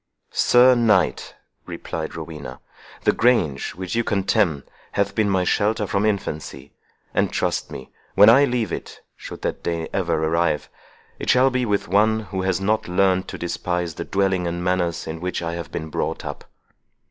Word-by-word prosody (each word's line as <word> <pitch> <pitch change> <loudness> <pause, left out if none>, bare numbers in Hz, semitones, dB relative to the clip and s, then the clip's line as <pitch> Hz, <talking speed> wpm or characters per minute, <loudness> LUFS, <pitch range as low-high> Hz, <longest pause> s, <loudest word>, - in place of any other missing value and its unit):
"Sir 125 +1 +5
Knight," 110 -7 +1 0.3
replied 80 0 -5
Rowena, 75 -5 -8 0.4
"the - - +4
grange 90 - +1
which 95 0 -5
you 115 - +1
contemn 95 -7 +1 0.3
hath 100 - 0
been 110 -2 +1
my 95 -2 +2
shelter 105 +3 +1
from 100 +2 0
infancy; 75 -9 -4 0.4
and, - - +1
trust - - -1
me, 65 - -9 0.2
when 100 +2 +8
I 135 +5 +7
leave 125 -5 -1
it—should - - -9
that - - -2
day 85 -1 -2
ever 85 -4 0
arrive—it 80 -1 -3
shall 130 +2 +5
be 125 -1 0
with 100 -1 0
one 110 +4 +3
who 95 -2 -4
has 95 -1 0
not 105 +3 0
learnt 95 +1 +2
to - - -6
despise 90 -1 -2
the - - -5
dwelling 95 -2 0
and 85 +1 -3
manners 90 -2 0
in 80 +1 -6
which 90 -1 -3
I 85 0 -3
have 85 -2 -6
been 80 0 -5
brought - - -3
up." - - -7
95 Hz, 165 wpm, -22 LUFS, 85-105 Hz, 0.4 s, when